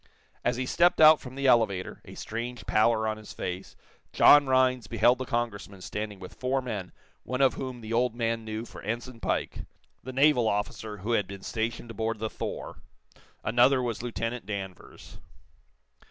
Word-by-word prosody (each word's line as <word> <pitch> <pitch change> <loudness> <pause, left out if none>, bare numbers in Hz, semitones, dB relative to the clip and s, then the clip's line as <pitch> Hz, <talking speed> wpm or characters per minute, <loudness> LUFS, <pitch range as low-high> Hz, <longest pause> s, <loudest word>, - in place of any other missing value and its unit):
As 120 - +1
he 130 - -1
stepped 175 +7 +3
out 155 0 +8
from 130 -1 -10
the 140 0 -3
elevator, 110 -7 +2
a - - -11
strange 120 +2 -5
pallor 110 0 +2
on 110 0 -2
his 110 -1 -11
face, 90 +2 -5 0.4
John 145 -1 +7
Rhinds 130 -3 +2
beheld 120 +3 +3
the 130 - -3
Congressman 105 -5 -3
standing 105 0 -5
with 90 -1 -10
four 130 +1 -1
men 105 -8 -5 0.3
one 125 0 -4
of 135 -2 +4
whom 130 -2 -6
the 110 +1 -5
old 120 0 +1
man 115 -1 -1
knew 110 +1 -5
for - - -11
Ensign 120 +2 -5
Pike, - - -2 0.4
the 130 - -7
naval 135 -3 +4
officer 105 +1 -2
who 120 - -1
had 105 -4 +1
been 100 -1 -9
stationed 115 +1 -3
aboard 115 0 -2
the 110 0 -4
'Thor.' - - -6 0.6
Another 120 +4 +4
was 120 -4 -2
Lieutenant 115 -2 -4
Danvers. 95 -3 -8
115 Hz, 170 wpm, -28 LUFS, 110-125 Hz, 0.6 s, out